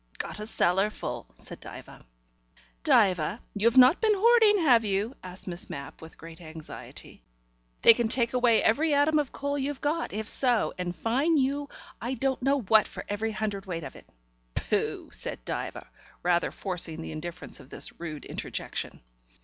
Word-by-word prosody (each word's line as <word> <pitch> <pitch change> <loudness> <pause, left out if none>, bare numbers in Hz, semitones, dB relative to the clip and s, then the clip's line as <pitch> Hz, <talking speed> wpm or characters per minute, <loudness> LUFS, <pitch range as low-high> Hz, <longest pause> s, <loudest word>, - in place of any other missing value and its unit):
"Got 165 +5 -4
a 210 - -5
cellar 195 -1 +2
full," 125 - -6
said - - -10
Diva. - - -11 0.8
"Diva, 185 +1 +3
you've 230 +4 +2
not 255 +6 +7
been 435 -2 +4
hoarding, 440 0 +5
have 245 -6 +5
you?" 205 +3 -1
asked 185 0 -10
Miss 175 -2 -4
Mapp 140 0 -8
with 160 0 -12
great 165 +1 -12
anxiety. 160 - -10 0.6
"They - - +10
can 235 0 0
take 235 +1 +2
away 245 -3 +4
every 295 +7 +3
atom 300 +2 +3
of 290 -4 -2
coal 285 0 -3
you've 275 0 -3
got, 315 +3 -1
if 215 +1 -4
so, 245 -4 +3
and 180 -1 -3
fine 275 - +1
you 280 +1 0 0.3
I 245 +4 -2
don't 265 +1 -1
know 275 +1 +2
what 220 0 +4
for - - -8
every 215 +2 -2
hundredweight 200 -6 -4
of - - -8
it." - - -15 0.5
"Pooh!" - - -1
said - - -4
Diva, - - -5 0.4
rather 175 0 +2
forcing 175 -4 -3
the - - -6
indifference 170 +3 -6
of 130 - -15
this - - -4
rude 160 -3 -6
interjection. - - -4
220 Hz, 165 wpm, -28 LUFS, 180-270 Hz, 0.8 s, They